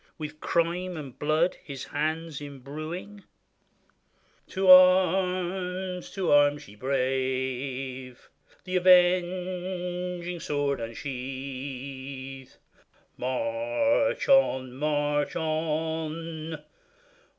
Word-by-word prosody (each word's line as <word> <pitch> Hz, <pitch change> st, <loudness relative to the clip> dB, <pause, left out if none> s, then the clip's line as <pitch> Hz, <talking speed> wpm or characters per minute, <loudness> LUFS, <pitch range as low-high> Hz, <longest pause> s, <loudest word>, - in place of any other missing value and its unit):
With 155 Hz, -1 st, -7 dB
crime 175 Hz, +2 st, 0 dB
and 140 Hz, -5 st, -9 dB
blood 155 Hz, +4 st, +1 dB
his 135 Hz, -3 st, -7 dB
hands 155 Hz, +1 st, -3 dB
imbruing. 155 Hz, +8 st, -7 dB, 1.2 s
To 190 Hz, 0 st, -1 dB
arms! 185 Hz, 0 st, +4 dB
to 190 Hz, -3 st, 0 dB
arms! 145 Hz, 0 st, +4 dB
ye 100 Hz, -, -13 dB
brave! 130 Hz, 0 st, -2 dB, 0.4 s
The 185 Hz, 0 st, -1 dB
avenging 180 Hz, 0 st, +2 dB
sword 145 Hz, -3 st, -1 dB
unsheathe; 130 Hz, +1 st, -6 dB, 0.7 s
March 285 Hz, -, 0 dB
on! 130 Hz, -, +4 dB
march 145 Hz, +1 st, 0 dB
on 160 Hz, 0 st, -3 dB
155 Hz, 70 wpm, -27 LUFS, 135-180 Hz, 1.2 s, arms